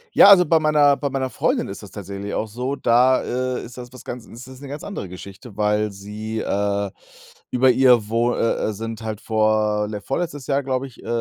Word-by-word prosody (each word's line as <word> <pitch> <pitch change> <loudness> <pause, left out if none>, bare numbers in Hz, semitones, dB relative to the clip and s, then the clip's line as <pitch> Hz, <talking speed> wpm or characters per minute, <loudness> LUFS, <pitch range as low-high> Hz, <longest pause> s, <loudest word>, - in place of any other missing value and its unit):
Ja, - - +9
also, 185 -3 +8
bei 160 +1 +4
meiner 150 -2 +4
bei 140 +1 -2
meiner 135 -1 -2
Freundin - - 0
ist - - -8
das - - -11
tatsächlich 100 +1 -6
auch 110 - -1
so, 125 +6 -3
da, 125 0 +3
äh, 130 0 -2
ist 120 - -11
das 125 -1 -9
was 125 -2 -12
ganz 120 -1 -7
ist 120 +3 -12
das 130 0 -12
'ne 140 - -8
ganz 145 +2 -7
andere 150 - -6
Geschichte, 100 +4 -11
weil 105 0 +1
sie, 105 +3 -6
äh, 100 -1 -1 0.6
über 130 +1 +4
ihr, 125 -4 +4
wo 120 +2 +1
äh, 115 - 0
äh, - - -3
sind 115 +2 -6
halt 110 -2 -5
vor 110 -1 +1
ne, 105 -1 -5
vorletztes 145 +1 -4
Jahr, 140 0 +1
glaube 130 0 -2
ich, 130 - -16
äh - - -11
120 Hz, 220 wpm, -22 LUFS, 105-130 Hz, 0.6 s, Ja